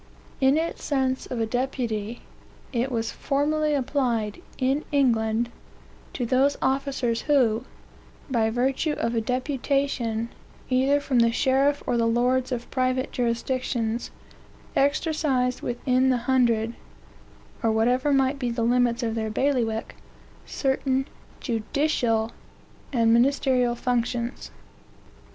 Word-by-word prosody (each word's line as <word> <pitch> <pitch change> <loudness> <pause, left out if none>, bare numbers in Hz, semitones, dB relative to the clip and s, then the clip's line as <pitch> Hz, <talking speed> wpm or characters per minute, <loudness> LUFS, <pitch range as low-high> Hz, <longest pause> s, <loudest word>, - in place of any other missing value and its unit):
In 270 +2 +4
its 330 +1 -2
sense 265 -2 0
of 250 - -4
a 225 - +1
deputy, 235 -2 -2 0.5
it 250 +2 0
was 225 -2 -1
formerly 300 +2 0
applied, 245 -6 -1 0.2
in 270 +4 +1
England, 235 -4 +2 0.6
to 250 - -2
those 265 +4 +2
officers 265 -3 0
who, 250 -5 +2 0.6
by 230 -5 +1
virtue 265 +6 0
of 230 -4 -2
a 230 - +1
deputation, 250 -2 -1 0.4
either 265 +3 +3
from 270 -3 +1
the 230 0 +4
sheriff 275 +3 +2
or 240 - 0
the 230 0 +2
lords 250 +3 +1
of 240 -1 -4
private 255 0 0
jurisdictions, 240 -1 -1 0.7
exercised 280 -3 +1
within 255 +2 +1
the 255 - +3
hundred, 235 -3 +2 0.9
or 225 - +2
whatever 245 +6 +2
might 270 0 +2
be 250 -2 -1
the 235 0 -1
limits 240 0 +2
of 225 -1 -1
their 220 -1 -2
bailiwick, 225 -2 0 0.5
certain 265 0 0 0.3
judicial 230 -2 0 0.6
and 230 -4 +3
ministerial 250 -1 +3
functions. 240 0 -2
250 Hz, 115 wpm, -25 LUFS, 230-270 Hz, 0.9 s, In